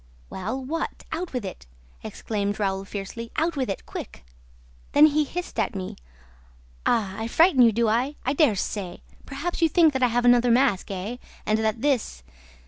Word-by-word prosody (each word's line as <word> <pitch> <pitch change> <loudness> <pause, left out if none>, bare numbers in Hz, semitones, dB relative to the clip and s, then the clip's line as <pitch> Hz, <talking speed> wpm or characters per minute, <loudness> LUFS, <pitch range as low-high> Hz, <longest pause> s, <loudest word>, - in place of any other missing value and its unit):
"Well, 205 +8 -3
what? 325 +5 -4
Out 335 +2 -3
with 250 -5 -3
it!" 125 - -8 0.3
exclaimed 205 - -3
Raoul 195 -1 -1
fiercely. 205 +4 -6
"Out 330 +1 0
with 260 -5 -1
it, 195 - -4
quick!" - - -8 0.7
"Then 295 +1 +8
he 305 0 +3
hissed 350 -2 -5
at 210 -2 0
me. 185 -1 -5 0.9
'Ah, 200 -4 +1
I 225 - -2
frighten 320 +2 +4
you, 235 -2 +7
do 230 +1 +1
I?... 245 +7 +1
I 265 - +1
dare 290 -7 +3
say!... 190 -1 -4 0.2
Perhaps 305 +6 -4
you 330 - +4
think 320 -1 +4
that 265 - -1
I 250 - +5
have 245 +1 0
another 245 0 +5
mask, 240 -5 +2
eh, 200 +5 -4 0.3
and 215 +1 +1
that 220 +2 -1
this 250 - 0
235 Hz, 180 wpm, -25 LUFS, 205-285 Hz, 0.9 s, Then